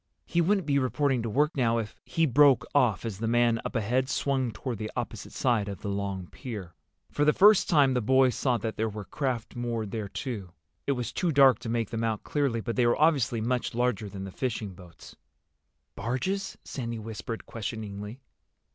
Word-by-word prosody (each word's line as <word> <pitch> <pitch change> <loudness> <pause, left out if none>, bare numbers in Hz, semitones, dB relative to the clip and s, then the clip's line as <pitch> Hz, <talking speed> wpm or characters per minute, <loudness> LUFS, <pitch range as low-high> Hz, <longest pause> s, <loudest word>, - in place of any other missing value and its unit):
He 170 - +1
wouldn't 195 +2 +2
be 140 -1 +2
reporting 135 -1 +1
to 115 - -3
work 150 +8 +1
now 115 -4 +2
if—" 110 -2 -4
He 165 - +1
broke 140 -1 +5
off 120 -8 +2
as 105 -4 -4
the 115 - -1
man, 120 0 +3
up - - -5
ahead, 125 +4 +1
swung 135 -4 0
toward 120 -2 -5
the 110 0 -3
opposite - - -5
side 115 -5 +1
of 100 -3 -7
the 100 - -4
long 100 -2 -3
pier. 105 -10 -7 0.4
For 145 - +1
the 150 0 +5
first 205 0 +6
time 140 -5 +5
the 125 - +1
boys 130 +2 +4
saw 125 -3 +1
that 110 0 -4
there 110 +1 0
were 105 -1 -7
craft 125 -5 -3
moored 115 -4 -3
there 105 -2 -4
too. 100 -7 -5 0.3
It 140 - +3
was 125 -2 -3
too 175 - 0
dark 135 -3 +6
to 120 -1 -6
make 115 -2 -1
them 115 -1 -2
out 110 -2 -1
clearly, 140 -6 0
but 115 +2 -4
they 120 -2 +4
were 120 - +2
obviously 135 -7 +3
much 125 +1 -1
larger 120 -3 0
than 95 -1 -7
the 95 - -6
fishing 110 -4 -3
boats. 90 -2 -14 0.8
"Barges?" 130 - -2
Sandy 115 -3 -5
whispered 110 +1 -6
questioningly. 105 +1 -6
120 Hz, 200 wpm, -28 LUFS, 110-135 Hz, 0.8 s, first